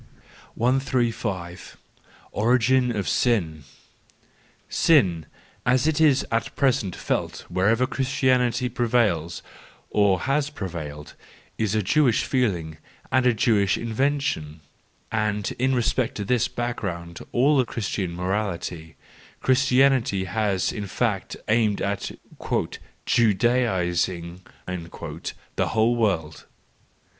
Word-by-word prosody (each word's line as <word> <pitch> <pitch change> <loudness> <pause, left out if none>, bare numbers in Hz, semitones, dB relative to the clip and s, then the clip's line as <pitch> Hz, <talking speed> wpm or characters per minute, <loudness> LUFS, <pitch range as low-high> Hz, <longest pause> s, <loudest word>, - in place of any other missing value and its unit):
135 115 -8 -1 0.5
Origin 125 +3 +3
of 105 -4 -2
Sin. 85 - +1 1.0
—Sin, 95 - +3 0.4
as 125 +2 +2
it 160 0 +1
is 145 -4 +4
at 115 0 -1
present 130 -9 +1
felt - - -3
wherever 110 +7 +2
Christianity 130 -2 +1
prevails 115 -9 0 0.5
or 100 -3 +3
has 140 +2 0
prevailed, 80 - -7 0.5
is 110 -2 0
a 110 - +1
Jewish 125 +3 +3
feeling 90 - -1 0.3
and 130 0 +3
a 125 - +4
Jewish 100 -3 +2
invention; 115 - -1 0.5
and 105 -2 -1
in 130 +1 +2
respect 120 0 0
to 105 - -4
this 120 +2 +2
background 90 -8 -4
of - - -12
all 135 +2 +4
Christian 100 -6 -3
morality, 90 -4 -3 0.4
Christianity 130 -5 +3
has 100 0 0
in 105 -2 -5
fact 105 -1 -2
aimed 105 -2 +2
at 100 -1 -2 0.2
" - - -5
Judaising" 95 -7 +1 0.3
the 85 -2 -5
whole 115 +2 +2
world. 90 -9 -1
110 Hz, 100 wpm, -24 LUFS, 90-125 Hz, 1.0 s, is